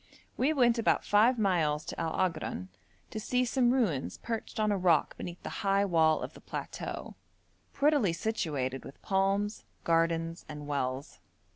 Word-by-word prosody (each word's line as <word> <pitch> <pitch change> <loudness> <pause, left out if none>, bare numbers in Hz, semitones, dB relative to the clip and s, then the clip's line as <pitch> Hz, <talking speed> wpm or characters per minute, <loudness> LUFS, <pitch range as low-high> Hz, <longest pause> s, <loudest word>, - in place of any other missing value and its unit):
We 275 +4 +2
went 240 -5 +3
about 230 - +2
five 225 +5 +4
miles 165 -8 +1
to - - -6
Al 165 -1 -1
Agran 160 - -1 0.4
to 215 - -4
see 250 +3 +1
some 245 0 +2
ruins 205 - 0
perched 230 0 -5
on 215 -1 +2
a - - +2
rock 170 -5 +3
beneath 175 0 -7
the - - -4
high 200 -1 +3
wall 160 -4 +3
of - - -6
the - - -14
plateau, - - -6 0.6
prettily 280 - +3
situated 150 - -2
with 140 - -11
palms, 195 +2 0 0.2
gardens, 165 0 +1
and 150 -1 -7
wells. 140 0 -3
185 Hz, 155 wpm, -30 LUFS, 160-225 Hz, 0.6 s, five